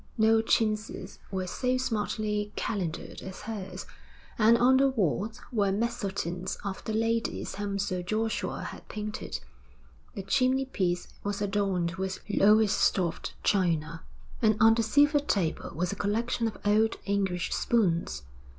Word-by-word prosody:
No 220 0 +5
chintzes 215 -1 -1
were 190 -1 -2
so 250 +7 0
smartly 210 -3 -1
calendered 180 -7 -3
as 190 0 -8
hers, 210 -4 -6 0.5
and 225 +2 +6
on 255 +2 +5
the 275 +1 +4
walls 215 - -1
were 205 -5 +2
mezzotints 195 -5 -2
of 195 -1 -4
the 220 - -2
ladies 225 +1 -1
whom 200 0 -3
Sir 185 -2 -1
Joshua 220 +5 -2
had - - -8
painted. 215 0 -5 0.7
The 195 - -4
chimney 260 +6 +2
piece 180 -8 -1 0.2
was 200 0 -2
adorned 195 -4 0
with 190 0 -3
Lowestoft 205 -4 +3
china, 165 -4 +1 0.4
and 215 -2 +4
on 225 -1 +7
the 230 - +1
silver 290 +6 +4
table 195 - -1
was 175 +2 -1
a - - -3
collection 225 +3 0
of 220 - -5
old 215 +2 +3
English 195 -3 0
spoons. 170 - +1
210 Hz, 135 wpm, -29 LUFS, 190-225 Hz, 0.7 s, on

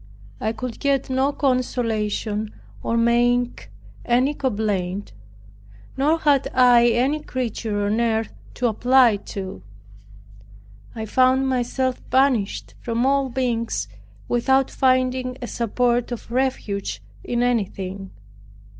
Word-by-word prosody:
I 220 - -1
could 245 0 -6
get 275 -2 0
no 265 +2 +2
consolation 225 -6 -1 0.3
or 230 - -1
make 240 +1 +1 0.3
any 255 +4 +2
complaint; 205 - -2 0.8
nor 300 +4 +2
had 290 -4 +2
I 245 -2 +6
any 255 +6 +2
creature 225 -7 -3
on 215 +3 +1
earth 225 -1 0 0.2
to 250 - -2
apply 245 0 +4
to. 190 - -7 1.3
I 220 -1 -4
found 260 +3 +3
myself 255 0 -1
banished 260 -6 +1
from 235 +1 -1
all 275 0 +2
beings 230 - -1 0.4
without 265 +2 +2
finding 255 -1 +1
a 245 - -5
support 240 +1 0
of 235 -1 -7
refuge 235 - -2 0.2
in 240 0 -1
anything. 195 -5 -2
245 Hz, 110 wpm, -22 LUFS, 220-260 Hz, 1.3 s, I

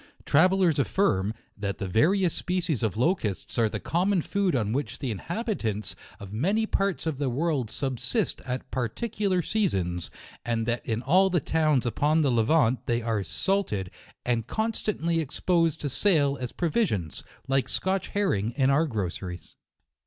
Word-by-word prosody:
Travellers 180 0 +4
affirm, 105 - +1 0.2
that 100 -2 -3
the 100 - -3
various 170 - +3
species 175 -7 -1
of 110 -4 -1
locusts 120 - 0
are 115 -2 +3
the - - -4
common 180 +1 +1
food 200 -5 0
on 110 -3 0
which 140 +3 -2
the 130 -4 -3
inhabitants 115 - -3 0.2
of 100 0 -9
many 195 - +1
parts 195 -4 -1
of 155 -4 -2
the 140 -3 0
world 140 -2 0
subsist 135 - -2
at 130 0 -5
particular 185 - -1
seasons, 95 - -1 0.3
and 115 -1 -1
that 120 0 -1
in 115 +1 -1
all 185 +6 +4
the 175 -2 +2
towns 155 -5 +1
upon 150 +6 +2
the 140 - +2
Levant, 120 +2 +3
they 120 -1 0
are 110 -3 0
salted, 100 - -1 0.3
and 120 -2 0
constantly 210 - -1
expo 165 +3 +1
sed 160 - -9
to 145 - -1
sale 145 -2 +2
as 125 - -3
provisions, 155 - -1 0.2
like 135 -2 +1
Scotch 190 0 0
herring 120 - 0
in 135 -1 +3
our 155 +4 +3
groceries. 95 - -5
140 Hz, 155 wpm, -27 LUFS, 115-180 Hz, 0.3 s, Travellers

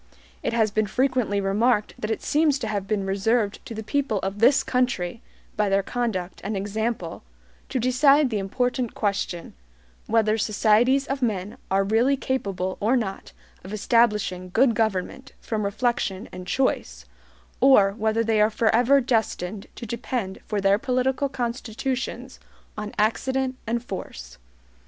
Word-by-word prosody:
It - - -2
has 220 -3 +2
been 215 0 +1
frequently 250 -3 +1
remarked 210 +3 +1
that 215 - -3
it 220 - -2
seems 300 -1 +2
to 245 -5 -4
have 200 -2 -3
been 205 -2 -1
reserved 200 +2 0
to 230 - -7
the 220 - -5
people 270 -1 0
of 195 +2 -3
this 260 +5 +5
country, 235 -6 -1 0.3
by 210 -3 +1
their 195 0 +2
conduct 205 -6 -3
and 205 0 -2
example, 205 -2 -3 0.5
to 265 - -2
decide 265 +3 +4
the 215 - 0
important 245 +4 -1
question, 200 -4 -2 0.5
whether 220 -1 +2
societies 225 +6 +3
of 275 0 -3
men 205 -5 -1
are 195 +1 +2
really 230 +7 +2
capable 195 -9 -2
or 230 +6 +2
not 200 -5 -4 0.3
of 185 - -9
establishing 210 -5 +1
good 235 +6 +3
government 220 +4 -2
from 215 -2 -3
reflection 205 -1 -1
and 180 0 -9
choice, 65 - -1 0.5
or 245 -7 +6
whether 220 +2 0
they 220 -1 +2
are 210 - +5
forever 235 +5 +3
destined 215 -5 -1
to - - -7
depend 230 -3 -4
for 210 - -1
their 195 +1 +3
political 260 +2 0
constitutions 250 0 -4 0.4
on 210 0 -5
accident 260 +5 0
and 235 +1 -1
force. 60 - -7
220 Hz, 145 wpm, -24 LUFS, 200-250 Hz, 0.5 s, or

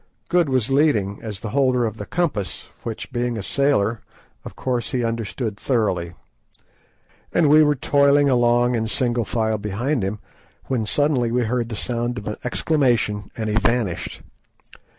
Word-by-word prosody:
Good 175 -4 +3
was 130 -2 +1
leading, 130 -9 +2
as 105 -3 -6
the 110 - -4
holder 130 -3 +2
of 110 -1 -4
the 100 - -7
compass, 155 - -2
which, 115 +3 -6
being 120 -1 -1
a 105 - -4
sailor, 115 -4 +1 0.4
of - - -9
course 125 -2 -2
he 125 -2 0
understood 115 -1 -3
thoroughly, 95 -9 0 1.2
and 165 - +3
we 155 +2 +7
were 150 -1 +4
toiling 140 +1 +3
along 120 -1 +3
in 115 -2 0
single 120 0 0
file 110 0 -1
behind 115 +7 -1
him, 100 +2 -2 0.5
when 120 -5 -1
suddenly 135 -3 +1
we 125 +1 +1
heard 120 0 -1
the 115 - -4
sound 120 +2 -2
of 105 - -6
an 105 - -3
exclamation, 120 -7 +1
and 110 -1 -2
he - - -1
vanished. 115 -6 -1
120 Hz, 160 wpm, -22 LUFS, 110-135 Hz, 1.2 s, we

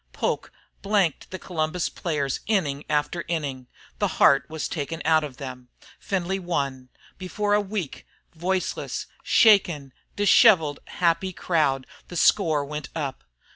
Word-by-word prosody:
Poke - - -2 0.3
blanked 195 -7 0
the 185 - -6
Columbus 165 -1 -2
players 145 -6 -2
inning 150 -10 0
after 150 +3 0
inning. 140 -7 -3 0.3
The - - +2
heart 135 -2 +5
was 160 -1 -3
taken 160 +1 -4
out 160 -1 +4
of 140 -4 -7
them. 130 -2 -8 0.3
Findlay 190 0 -2
won. 140 -8 -3 0.3
Before 205 +3 -1
a 210 - +4
weak, 195 -7 -5 0.3
voiceless, 180 +3 -2 0.2
shaken, 170 - +4 0.2
dishevelled, 195 - +5
happy 180 +2 0
crowd 145 -7 0 0.2
the 175 - -7
score 160 -6 +3
went 150 -1 -6
up. 140 -5 -4
160 Hz, 130 wpm, -25 LUFS, 140-185 Hz, 0.3 s, heart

